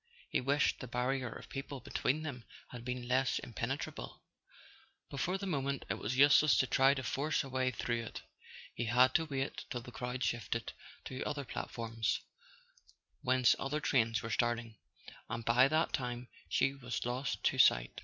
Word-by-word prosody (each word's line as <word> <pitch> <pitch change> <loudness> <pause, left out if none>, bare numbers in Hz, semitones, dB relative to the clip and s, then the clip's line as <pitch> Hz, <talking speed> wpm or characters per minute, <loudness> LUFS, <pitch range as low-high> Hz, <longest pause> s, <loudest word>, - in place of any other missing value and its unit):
He - - +2
wished 140 +3 +2
the 130 - -6
barrier 125 +1 -1
of - - -9
people 135 0 -6
between 140 +3 -1
them 130 -6 -5 0.3
had 120 -2 -8
been 125 0 -4
less 130 +1 +2
impenetrable; 120 +4 -5 0.9
but 140 - -5
for 180 +7 0
the 195 - -5
moment 140 -6 -1
it - - -2
was 120 +5 -2
useless 145 +2 +7
to - - +4
try 135 +2 +4
to 130 - -3
force 145 +7 0
a 135 - -8
way 130 0 +1
through 120 -1 -2
it. - - -8 0.5
He 120 - -2
had 125 +3 +5
to 160 - +3
wait 135 -2 -3
till 120 - -3
the 125 - -10
crowd 125 +1 -4
shifted 115 0 -2 0.3
to 130 0 -4
other 145 -2 -3
platforms, 115 -1 -2 1.0
whence 130 -1 +4
other 140 +3 -1
trains 115 -7 +2
were 115 - -4
starting, 120 -1 0 0.5
and 115 -1 -4
by 125 +3 +6
that 155 +3 +1
time 125 -1 -3 0.2
she 135 - +2
was 125 -4 -4
lost 125 +3 -2
to - - +2
sight. - - +4
130 Hz, 175 wpm, -34 LUFS, 120-140 Hz, 1.0 s, useless